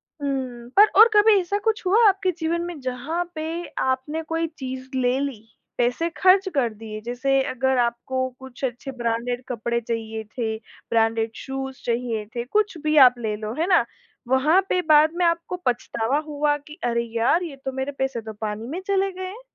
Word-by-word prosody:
हुँ। 260 -5 -5
पर 420 +2 +9
और 450 - +11
कभी 415 -1 +6
ऐसा 375 +3 -1
कुछ 445 -3 0
हुआ 425 +4 +5
आपके 380 -1 +2
जीवन 335 +1 0
में 345 -4 -6
जहाँ 260 +7 -2
पे 310 - -3 0.4
आपने 260 +5 -1
कोई 325 +1 -1
चीज़ 260 -1 -6
ले 255 +1 +1
ली, 275 -6 -3 0.4
पैसे 250 +8 +1
खर्च 380 +1 +5
कर 240 -5 +1
दिए, 215 0 -8
जैसे 260 +4 0
अगर 265 +1 +1
आपको 250 +2 -1
कुछ 265 0 -12
अच्छे 245 +2 -5
ब्रांडेड 240 0 -2
कपड़े 235 0 -1
चाहिए 225 -1 -4
थे, 220 -2 -1 0.3
ब्रांडेड 225 0 +1
शूज़ 270 -1 -6
चाहिए 235 -2 -1
थे, 235 - -1
कुछ 410 - 0
भी 310 0 +1
आप 250 - 0
ले 215 -2 -2
लो 215 +1 -5
है 335 - +1
ना, 350 -11 +4 0.4
वहाँ 270 +8 +4
पे 365 - +2
बाद 310 +1 +6
में 360 - +2
आपको 335 +1 0
पछतावा 240 +1 0
हुआ 295 0 +1
की 300 +2 -14
अरे 235 -1 +1
यार, 240 +10 +3
ये 320 -5 -6
तो 265 - -1
मेरे 265 +2 -3
पैसे 265 -3 -1
तो 220 0 -8
पानी 215 +1 -3
में 330 +8 -4
चले 390 0 +1
गए 370 0 -6
हैं? 415 +6 -9
265 Hz, 185 wpm, -23 LUFS, 235-330 Hz, 0.4 s, और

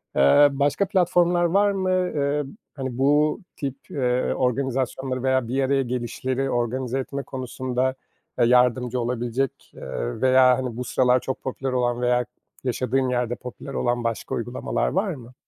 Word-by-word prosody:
eee, 70 - +6
başka 145 +8 +1
platformlar 175 -2 +3
var 200 +4 +3
mı? 190 -1 -1
Eee, 150 -6 0 0.3
hani, 130 -4 -4
bu 145 +3 +3 0.2
tip, 135 -2 -4 0.2
eee, 125 -2 0
organizasyonları 130 0 -1
veya 130 -2 +1
bir 135 +3 0
araya 135 +1 +2
gelişleri 125 +2 -2
organize 125 +2 -1
etme 140 +1 -4
konusunda, 130 0 -2 0.4
eee, - - +5
yardımcı 125 0 +3
olabilecek, 120 +2 -2
eee, - - -5
veya, 130 -1 +5
hani, 125 -3 -4
bu 125 - -2
sıralar 125 0 +3
çok 130 +1 -5
popüler 135 0 -3
olan 120 -1 0
veya 125 0 +2 0.4
yaşadığın 130 +1 0
yerde 120 -1 0
popüler 125 +3 -9
olan 120 -2 0
başka 115 -2 -2
uygulamalar 120 +2 -2
var 190 0 0
mı? 125 -4 -12
130 Hz, 145 wpm, -24 LUFS, 125-140 Hz, 0.4 s, eee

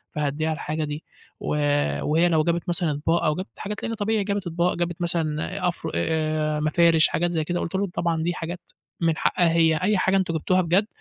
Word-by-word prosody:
فهاديها 150 +2 -1
الحاجه 155 0 -3
دي 150 +1 -5 0.4
و - - -8 0.6
وهي 165 +4 +2
لو 160 -2 +3
جابت 170 +2 -1
مثلًا 170 -2 +1
أطباق، 160 +4 0
أو 155 - +2
جابت 185 +4 -8
حاجات 210 0 -5
لإن 230 - -2
طبيعي 215 -1 0
جابت 200 -1 -2
أطباق، 170 +1 +1
جابت 175 0 -3
مثلًا 165 -1 -1
أف 175 -2 -3
آآ، 155 -1 0
مفارش 160 +1 +4
حاجات 175 +1 0
زي 160 -2 0
كده، 175 +3 -2
قُلت 170 - -4
لهم 195 0 0
طبعًا 165 -2 0
دي 175 +1 0
حاجات 175 +1 -5 0.4
من 165 -2 +2
حقّها 175 -2 +2
هي، 165 -1 +4
أي 210 +1 +3
حاجه 190 +1 +2
أنتم 185 -3 0
جبتوها 185 +4 +2
بجد 185 +5 +2
170 Hz, 200 wpm, -24 LUFS, 155-180 Hz, 0.6 s, مفارش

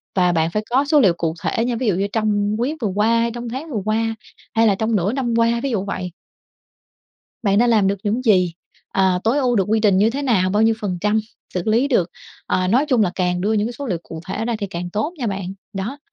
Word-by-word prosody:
và 180 -2 +3
bạn 165 -1 +1
phải 210 +4 -1
có 265 +4 +2
số 300 +1 +4
liệu 195 -10 +5
cụ 165 -2 -1
thể 230 - 0
nha, 245 -1 -1
ví 235 +1 -2
dụ 200 - +2
như 195 +2 0
trong 210 -1 +1
quý 280 +6 -1
vừa 220 - +1
qua, 225 +3 +3
hay 235 0 0
trong 240 0 -6
tháng 265 +7 -6
vừa 220 -6 -2
qua, 225 +1 0 0.4
hay 225 0 +4
là 200 - +3
trong 220 +3 0
nửa 200 +3 +1
năm 255 -3 -1
qua, 230 0 +2
ví 275 - -1
dụ 200 -4 -1
vậy. 185 -3 -4 1.3
Bạn 200 -2 +3
đã 240 - +4
làm 220 -4 +3
được 200 +1 0
những 220 +5 -1
gì? 185 -6 +3 0.4
À, 190 -2 +2
tối 235 +6 +2
ưu 250 -4 +1
được 195 - +3
quy 220 +1 +2
trình 200 -3 +3
như 215 +3 +4
thế 275 +4 -3
nào? 200 -9 +2
Bao 205 +3 +2
nhiêu 225 0 +4
phần 185 -4 -2
trăm 210 +2 +2 0.3
xử 180 - -1
lý 230 +6 +2
được? 185 - +1 0.4
Ờ, 185 - +1
nói 255 +9 +3
chung 250 -6 +3
là 190 - +2
càng 180 -1 0
đưa 205 +4 +1
những 210 -1 +1
cái - - -6
số 280 +4 -6
liệu 185 -8 -1
cụ 160 -1 -8
thể 215 +3 -3
ra 235 -1 -1
thì 205 - -3
càng 175 -1 -5
tốt 215 - -2
nha 245 - -2
bạn. 195 -2 -4 0.2
Đó, 205 +9 -4
215 Hz, 265 wpm, -20 LUFS, 190-235 Hz, 1.3 s, liệu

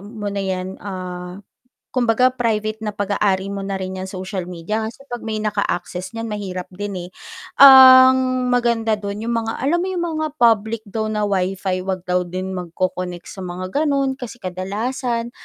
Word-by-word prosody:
mo 210 -1 -6
na 200 - -2
‘yan, 190 0 -3
ah, 180 -2 -6 0.6
kumbaga 245 0 +3
private 220 -3 -1
na 210 - -2
pag-aari 200 -1 0
mo 200 - -4
na 195 0 -3
rin 190 0 -4
‘yang 190 - -5
social 185 0 -4
media 210 +6 -3
kasi 245 +4 -11
‘pag 240 - -5
may 220 -1 -3
naka-access 185 -3 -2
niyan 225 0 -4
mahirap 185 -3 -4
din 190 -3 -5
eh. - - -15 0.5
Ang 260 -1 +8
maganda 235 -3 +2
dun, 200 0 -5
yung 235 0 -1
mga 225 0 -2
alam 320 +6 +1
mo 370 - -1
yung 345 -2 -1
mga 310 0 -1
public 220 -1 +3
daw 215 +2 -2
na 210 -1 -1
Wi-Fi, 190 -1 -1
‘wag 185 -2 -2
daw 180 0 +1
din 185 +2 -4
magco-connect 180 0 -4
sa - - -10
mga 185 - -3
ganon 275 -2 +1
kasi 240 -1 -8
kadalasan 230 +6 -3
210 Hz, 170 wpm, -20 LUFS, 185-235 Hz, 0.6 s, Ang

